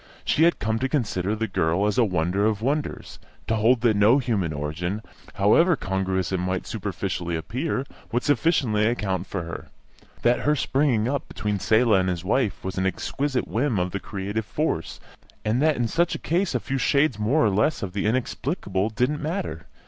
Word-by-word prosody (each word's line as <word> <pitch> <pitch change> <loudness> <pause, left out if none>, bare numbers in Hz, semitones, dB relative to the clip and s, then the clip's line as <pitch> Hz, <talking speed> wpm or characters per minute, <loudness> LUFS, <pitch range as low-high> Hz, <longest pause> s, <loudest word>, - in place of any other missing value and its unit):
She 160 - +4
had 170 - +3
come 110 +2 -1
to 130 - -1
consider 105 -7 -1
the 115 +1 -2
girl 85 0 +1
as 105 +3 +1
a - - +6
wonder 90 0 0
of 110 -1 -1
wonders, 145 +3 -2 0.3
to 110 - 0
hold 115 +3 +3
that 115 -3 +3
no 105 +6 +5
human 110 - 0
origin, 80 +8 -3 0.3
however 165 - +4
congruous 95 -4 -1
it 95 - 0
might 90 +1 -2
superficially 95 -4 -3
appear, 125 - -2 0.3
would 120 +1 0
sufficiently 135 -8 +2
account 100 -6 -1
for 95 -4 -3
her; 85 0 -7 0.6
that 120 +1 +3
her 150 +1 +2
springing 135 -5 +1
up 140 +1 -2
between 105 -2 -2
Selah 110 0 +4
and 95 0 0
his 90 -1 -3
wife 110 0 0
was 95 0 -3
an 95 - +1
exquisite 125 +6 -2
whim 120 -1 0
of 90 0 0
the 100 - -3
creative 100 +3 -4
force; 145 - -2 0.5
and 110 +5 +1
that 155 -1 +3
in 120 -1 0
such 170 +8 +1
a - - -2
case 170 -2 0
a - - +2
few 135 +3 -3
shades 140 -3 +2
more 115 +7 +2
or 105 - +3
less 110 +7 +1
of 95 -2 -4
the 100 +1 -1
inexplicable 110 - -1
didn't 125 +7 0
matter. 155 - -4
110 Hz, 190 wpm, -24 LUFS, 95-130 Hz, 0.6 s, a